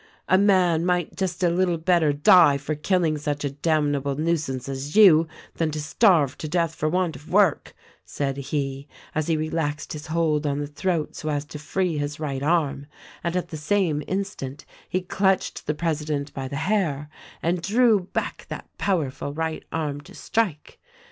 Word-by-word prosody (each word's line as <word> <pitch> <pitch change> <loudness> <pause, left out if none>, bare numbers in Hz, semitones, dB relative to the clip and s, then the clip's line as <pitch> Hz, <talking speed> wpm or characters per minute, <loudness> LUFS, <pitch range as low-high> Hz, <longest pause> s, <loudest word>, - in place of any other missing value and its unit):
" - - -38
'A 185 - +6
man 185 -5 +3
might 180 -2 0
just 185 -2 -2
a 175 - +4
little 175 -1 +1
better 165 -2 +3
die 145 0 +6
for 145 +2 -3
killing 155 0 +1
such 145 -1 -2
a 140 - -1
damnable 145 -2 0
nuisance 150 -5 -1
as 135 +3 -5
you, 170 -7 +7 0.3
than 165 -1 +1
to 155 0 -4
starve 155 - +3
to 155 - -4
death 165 0 0
for 155 0 -1
want 180 -1 0
of 150 - -13
work,' 195 -4 +2 0.3
said 135 -2 -3
he 140 0 -3 0.3
as 155 -1 -1
he 165 -2 +2
relaxed 155 -1 -2
his 150 -1 -7
hold 155 -2 +1
on 140 -1 0
the 145 - -2
throat 155 +2 -2
so 155 - -4
as 145 -1 -1
to 150 0 -9
free 165 +1 -1
his 145 +1 -3
right 140 -4 -3
arm, 145 -3 0 0.4
and 170 +1 -1
at 180 -1 -2
the 160 - -6
same 155 -1 +1
instant 185 -8 -4 0.2
he 185 - 0
clutched 190 +1 0
the 150 - 0
president 150 -3 -2
by 135 -1 -4
the 140 - -6
hair 155 -3 0 0.4
and 170 +1 0
drew 220 +3 +4
back 180 - -4
that - - -6
powerful 150 -8 -1
right 160 +1 -3
arm 150 -3 -2
to - - -15
strike. 195 -10 -2
155 Hz, 180 wpm, -24 LUFS, 145-180 Hz, 0.4 s, you